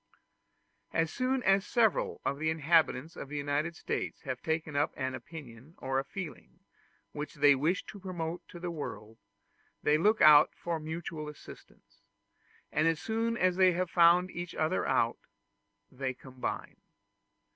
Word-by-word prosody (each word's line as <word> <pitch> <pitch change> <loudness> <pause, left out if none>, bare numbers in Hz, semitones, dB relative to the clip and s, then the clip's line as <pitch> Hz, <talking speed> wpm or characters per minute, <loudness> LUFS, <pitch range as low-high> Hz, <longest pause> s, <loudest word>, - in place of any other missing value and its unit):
As 165 -1 0
soon 255 0 0
as 195 0 +4
several 225 -2 +1
of 140 - -1
the 160 +1 0
inhabitants 160 -2 +2
of 135 - -8
the 150 - -4
United 145 +3 -1
States - - -4
have 130 -3 -4
taken 160 -1 -2
up 145 +2 +2
an 130 -1 -2
opinion 135 0 -10
or 135 0 -1
a - - -2
feeling 175 +1 -8 0.5
which 150 0 -6
they 145 0 +6
wish 155 +7 0
to 205 - -10
promote 175 -3 -4
in 175 - -10
the 175 -1 -3
world, 110 -8 -7 0.6
they 150 +1 +3
look 215 +6 +3
out 150 -1 +7
for 170 -2 -3
mutual 155 -1 -5
assistance; 150 - -15 0.7
and 155 +2 +2
as 165 -1 +1
soon 230 +1 -1
as 185 -4 +2
they 185 -1 +5
have 180 0 -2
found 175 +2 +5
each 175 0 -6
other 160 +4 0
out, 115 0 +1 0.7
they 130 0 -3
combine. 130 0 -6
160 Hz, 155 wpm, -31 LUFS, 145-180 Hz, 0.7 s, out